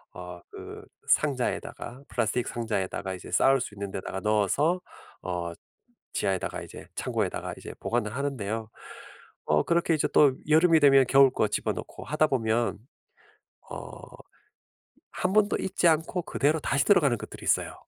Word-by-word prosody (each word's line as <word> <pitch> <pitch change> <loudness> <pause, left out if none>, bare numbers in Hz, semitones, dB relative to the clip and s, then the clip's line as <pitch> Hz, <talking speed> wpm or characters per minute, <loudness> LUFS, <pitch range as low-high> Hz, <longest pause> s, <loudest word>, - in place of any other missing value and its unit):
어 90 -1 -8
그 - - -9 0.2
상자에다가 130 -2 -1
플라스틱 120 +1 -1
상자에다가 100 -4 -3
이제 90 - -11
쌓을 135 -1 +4
수 105 - -6
있는 100 -1 -5
데다가 95 0 -5
넣어서 110 - +2 0.4
어 85 -2 -3 0.6
지하에다가 95 -1 -1
이제 - - -11
창고에다가 - - -2
이제 - - -9
보관을 115 -2 -2
하는데요. 115 -6 -3 0.8
어 75 0 +3
그렇게 170 -1 +2
이제 155 - +1
또 140 -3 +6 0.2
여름이 160 +1 +5
되면 135 -2 +6
겨울 135 +1 +6
거 110 - +1
집어 - - -1
넣고 - - -8
하다 155 +3 +2
보면 115 -5 0 0.9
어 - - -8 1.1
1 180 +1 -1
번도 210 0 +3
입지 185 -2 +1
않고 165 +3 0
그대로 150 +3 +1
다시 140 0 +1
들어가는 145 - +4
것들이 - - -10
있어요. - - +1
125 Hz, 320 characters per minute, -27 LUFS, 105-150 Hz, 1.1 s, 또